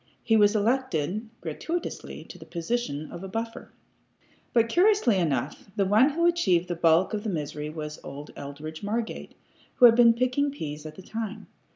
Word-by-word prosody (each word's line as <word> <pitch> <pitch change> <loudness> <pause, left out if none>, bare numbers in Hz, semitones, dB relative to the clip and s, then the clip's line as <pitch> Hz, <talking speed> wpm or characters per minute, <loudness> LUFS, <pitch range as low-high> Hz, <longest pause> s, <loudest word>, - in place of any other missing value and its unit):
He 225 - +3
was 210 0 +5
elected, 215 - 0
gratuitously, 320 - -5
to 180 - -12
the 160 - -11
position 170 -2 -3
of 175 - -8
a - - -5
buffer. 225 +3 -5 0.8
But, 230 -1 +3
curiously 355 - +3
enough, 145 -1 -2
the 200 - +2
one 215 +8 +5
who 335 +4 0
achieved 185 - +2
the 175 - -1
bulk 170 +4 +3
of 210 -1 -2
the 220 - -2
misery 150 -3 -4
was 150 -1 -6
old 145 +2 -8
Eldridge 150 +3 -8
Margate, 220 +3 -4 0.4
who 250 - +7
had 235 - +9
been 230 -1 +6
picking 255 +4 +1
pease 155 - -6
at 155 - -10
the 190 - -11
time. 220 0 -5
205 Hz, 175 wpm, -27 LUFS, 155-235 Hz, 0.8 s, had